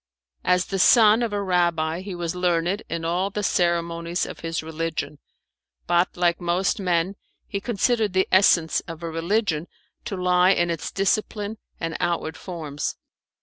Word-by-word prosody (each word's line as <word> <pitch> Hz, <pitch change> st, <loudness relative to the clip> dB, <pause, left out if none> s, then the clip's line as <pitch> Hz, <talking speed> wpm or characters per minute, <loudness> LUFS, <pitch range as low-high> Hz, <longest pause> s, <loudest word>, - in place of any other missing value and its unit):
As 180 Hz, 0 st, +2 dB
the 195 Hz, -, -3 dB
son 220 Hz, +3 st, +6 dB
of 235 Hz, -2 st, -1 dB
a 205 Hz, -1 st, -1 dB
rabbi 170 Hz, -3 st, +1 dB
he 190 Hz, -1 st, -6 dB
was 170 Hz, -1 st, -3 dB
learned 180 Hz, +2 st, 0 dB
in 165 Hz, 0 st, -3 dB
all 180 Hz, +4 st, 0 dB
the 210 Hz, +1 st, -4 dB
ceremonies 170 Hz, -2 st, 0 dB
of -, -, -8 dB
his 165 Hz, -1 st, -3 dB
religion, 160 Hz, -2 st, -4 dB, 0.7 s
but 175 Hz, +1 st, +1 dB
like 175 Hz, -1 st, +1 dB
most 175 Hz, +3 st, 0 dB
men 180 Hz, -1 st, +1 dB, 0.3 s
he 200 Hz, -, -4 dB
considered 225 Hz, -2 st, +1 dB
the 190 Hz, 0 st, +2 dB
essence 180 Hz, -4 st, +4 dB
of 165 Hz, -1 st, -8 dB
a 165 Hz, -, -3 dB
religion 170 Hz, 0 st, 0 dB, 0.4 s
to 210 Hz, -5 st, -4 dB
lie 180 Hz, +1 st, +4 dB
in 175 Hz, -2 st, +1 dB
its 165 Hz, -, -3 dB
discipline 210 Hz, +2 st, -1 dB, 0.2 s
and 165 Hz, -1 st, -3 dB
outward 170 Hz, -2 st, -1 dB
forms. 155 Hz, -6 st, -5 dB
175 Hz, 155 wpm, -24 LUFS, 165-195 Hz, 0.7 s, son